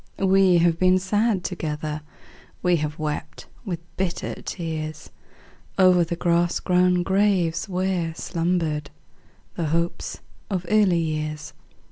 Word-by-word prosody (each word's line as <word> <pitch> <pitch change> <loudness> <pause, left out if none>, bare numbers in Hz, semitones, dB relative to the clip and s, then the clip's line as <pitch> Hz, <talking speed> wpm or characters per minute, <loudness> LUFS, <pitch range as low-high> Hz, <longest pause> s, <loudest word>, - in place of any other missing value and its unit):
We 190 -2 +4
have 170 -1 +3
been 185 0 +5
sad 205 +1 +1
together; 155 -4 -3 0.6
We 180 -1 +4
have 150 0 -3
wept 155 -1 -4 0.2
with 175 -5 -3 0.2
bitter 185 -2 -3
tears 155 -3 -5 0.7
O'er 185 -2 +6
the 170 +1 -3
grass 170 0 +1
grown 180 0 +3
graves 190 -2 +1
where 180 -3 -1
slumbered 165 -4 -1 0.6
The 170 - -2
hopes 170 +2 -2 0.3
of 185 -3 -2
early 205 -5 +4
years. 155 -1 -3
175 Hz, 115 wpm, -24 LUFS, 160-185 Hz, 0.7 s, O'er